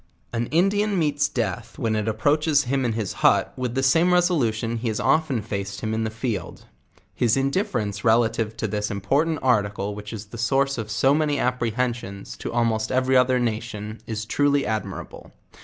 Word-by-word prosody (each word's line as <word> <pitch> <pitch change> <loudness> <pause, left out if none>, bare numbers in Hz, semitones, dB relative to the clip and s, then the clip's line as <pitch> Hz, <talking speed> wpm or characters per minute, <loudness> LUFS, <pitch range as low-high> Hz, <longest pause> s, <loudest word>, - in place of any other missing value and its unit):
An 115 0 -1
Indian 200 +5 +2
meets 145 -3 +1
death 115 0 -3
when 115 -3 0
it 105 0 -1
approaches 145 +7 +2
him 135 +2 0
in 115 - 0
his 110 -4 -3
hut - - +3
with 125 -1 -3
the 135 - +1
same 165 +7 +4
resolution 120 -11 +1
he 115 +1 -3
has 110 -2 -1
often 145 -8 +1
faced 100 -2 -4
hi - - -4
Ji - - -1
in 110 0 -1
the - - -1
field. 110 -5 -4 0.5
His 120 0 +2
indifference 135 - -1
relative 115 -1 +2
to 110 - -1
this 105 +1 -2
important 140 +11 0
article 105 -5 +1
which 105 0 -8
is 110 -2 -6
the 110 +3 -10
source 135 +2 +1
of 110 - -5
so 115 +6 +3
many 150 -1 +1
apprehensions 120 -5 -2
to - - -5
almost 115 -2 0
every 130 0 +2
other 125 0 +4
nation 110 -2 -3
is 110 -1 -4
truly 145 +3 +2
admirable. 110 -2 -5
115 Hz, 180 wpm, -24 LUFS, 110-135 Hz, 0.5 s, same